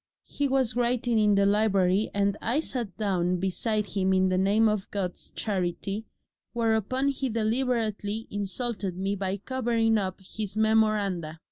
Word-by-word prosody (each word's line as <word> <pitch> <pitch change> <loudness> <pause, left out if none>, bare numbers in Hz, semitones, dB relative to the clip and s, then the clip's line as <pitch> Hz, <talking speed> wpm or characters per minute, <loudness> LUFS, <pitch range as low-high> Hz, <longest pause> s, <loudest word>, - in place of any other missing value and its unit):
He 285 - -1
was 260 -4 +1
writing 240 -1 +1
in 210 -1 +4
the 200 0 +4
library 200 -1 +2
and 200 0 +1
I 240 +6 +1
sat 240 - -4
down 180 -4 0
beside 210 +4 -1
him 190 0 0
in 185 0 +3
the 185 - +1
name 205 +4 +4
of 210 -2 -1
God's 185 -3 -4
charity, 195 +1 -3 0.5
whereupon 235 +3 +1
he 270 -1 -2
deliberately 225 -2 -1
insulted 205 -1 -3
me 195 +2 -1
by 195 0 -2
covering 230 -1 +1
up 190 -1 -3
his 205 +2 -6
memoranda. 210 -7 +1
210 Hz, 145 wpm, -27 LUFS, 195-230 Hz, 0.5 s, in